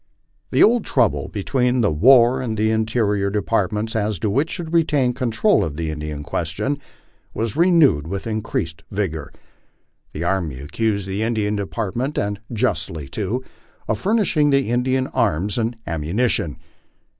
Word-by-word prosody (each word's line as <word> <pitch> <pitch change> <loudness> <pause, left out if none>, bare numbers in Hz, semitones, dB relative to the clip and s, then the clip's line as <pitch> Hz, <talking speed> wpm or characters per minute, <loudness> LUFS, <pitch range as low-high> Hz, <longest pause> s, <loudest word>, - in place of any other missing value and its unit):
The - - +4
old 235 0 +4
trouble 125 -5 +1
between 125 +4 0
the 105 - +2
War 120 - +5
and 110 -4 -3
Interior 110 -2 +1
Departments, 105 +1 -1
as 105 -2 0
to 100 +5 -1
which 140 +9 +1
should 170 -1 -5
retain 145 -6 +2
control 125 - +2
of 75 -2 -4
the 80 -2 -2
Indian 75 -1 -5
question, 85 - -2 0.6
was 115 +1 -2
renewed 160 - +4
with 95 +2 -4
incrensed 110 -7 -3
vigor. 95 -7 -3 0.8
The 75 - -5
Army 85 -7 -1
accused 100 +7 -1
the 95 +2 -3
Indian 110 -2 0
Department, 105 - -3
and 100 0 -1
justly 80 - -1
too, 110 - -2 0.4
of - - -1
furnishing 190 -8 +2
the 140 -4 +2
Indians 130 +2 +1
arms 105 -4 +1
and 115 +1 -1
ammunition. 85 - -1
110 Hz, 140 wpm, -21 LUFS, 95-125 Hz, 0.8 s, War